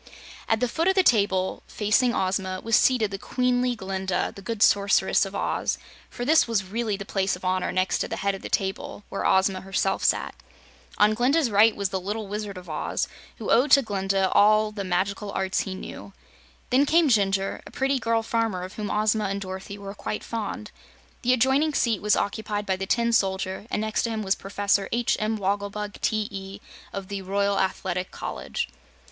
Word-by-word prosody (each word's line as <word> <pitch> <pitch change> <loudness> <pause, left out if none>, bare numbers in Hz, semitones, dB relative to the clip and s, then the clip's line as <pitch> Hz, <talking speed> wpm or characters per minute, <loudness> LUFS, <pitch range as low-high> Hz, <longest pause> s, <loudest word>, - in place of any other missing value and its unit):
At 225 +1 +2
the 250 - +3
foot 330 +8 -1
of 380 - +3
the 380 - +5
table, 200 - +2
facing 215 +4 +2
Ozma, 190 -2 -1
was 230 -1 +2
seated 230 -6 +3
the 195 - -5
queenly 250 +1 0
Glinda, 190 -2 -2
the 200 - -9
good 220 +2 0
Sorceress 200 0 +3
of - - -9
Oz, - - -1 0.3
for 245 - -5
this 310 +1 +5
was 225 -4 +1
really 210 +2 -2
the 200 - -7
place 195 -2 0
of 180 - -10
honor 185 0 0
next 185 +1 +1
to - - -1
the - - -4
head 200 0 0
of 195 - -7
the - - -7
table 195 +1 -2
where 195 - -3
Ozma 190 0 +2
herself 195 0 -1
sat. - - +1 0.6
On 210 +1 +5
Glinda's 255 +3 +2
right 210 +2 +5
was 200 -1 -1
the 190 - -2
Little 210 +3 -3
Wizard 205 -1 -5
of 180 -1 -10
Oz, 155 -2 -2 0.3
who - - -3
owed 255 +5 +4
to 275 0 +7
Glinda 195 -2 0
all 215 +1 +5
of - - -14
the 205 -2 -4
magical 195 +3 -1
arts 190 0 0
he 190 - -3
knew. 195 +1 -9 0.6
Then 270 +3 +4
came 330 +1 +4
Jinjur, 195 -5 +1
a - - -10
pretty 270 0 0
girl 230 -1 +1
farmer 225 -5 -1
of 185 - -7
whom 210 -2 -3
Ozma 215 0 +1
and 200 0 -2
Dorothy 190 +1 -7
were 200 -1 -7
quite 210 - -5
fond. 215 -1 -5 0.5
The 250 - +2
adjoining 265 +5 +2
seat 230 -5 +1
was 210 0 +3
occupied 205 0 -2
by 190 - 0
the 195 +1 -5
Tin 235 +1 +1
Soldier, 190 -1 0
and - - -1
next 215 0 0
to 235 - -1
him 220 -1 -3
was 190 -1 +2
Professor 200 0 0
H. 235 0 +1
M. 215 0 0
Wogglebug, 205 +1 -3
T.E., 200 -2 -2 0.3
of 195 -1 -6
the 200 0 -4
Royal 200 +1 0
Athletic 185 -1 -1
College. - - -4
205 Hz, 200 wpm, -25 LUFS, 195-225 Hz, 0.6 s, to